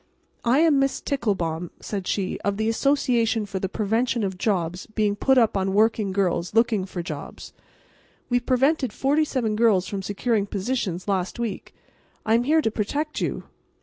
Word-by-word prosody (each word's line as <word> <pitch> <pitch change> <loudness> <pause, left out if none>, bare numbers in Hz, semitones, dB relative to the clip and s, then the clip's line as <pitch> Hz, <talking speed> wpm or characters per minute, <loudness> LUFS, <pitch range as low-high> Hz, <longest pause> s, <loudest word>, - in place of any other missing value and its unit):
"I 250 +5 +3
am 315 -4 +4
Miss 275 0 +1
Ticklebaum," 180 - -2
said 195 -3 -5
she, 195 -2 -1
"of 200 0 -1
the 220 0 0
Association 235 -3 +1
for 195 -1 -4
the 190 - -2
Prevention 225 +3 0
of 190 -1 -2
Jobs 180 -3 -1
Being 215 -2 0
Put 265 +5 +3
Up 230 -4 +4
on 190 0 0
Working 215 -1 +2
Girls 185 -1 -1
Looking 225 -4 +3
for 180 -2 -5
Jobs. - - -8 0.7
We 245 -1 +2
prevented 260 0 +1
forty 290 +3 +2
seven 235 -7 -1
girls 215 -5 +3
from 200 -1 -4
securing 205 +2 -1
positions 195 -3 -2
last 190 0 -1
week. 230 -5 -5 0.5
I 220 - +2
am 235 +2 +3
here 310 +2 +3
to 225 - +1
protect 290 +9 -2
you. - - -2
215 Hz, 170 wpm, -24 LUFS, 195-245 Hz, 0.7 s, am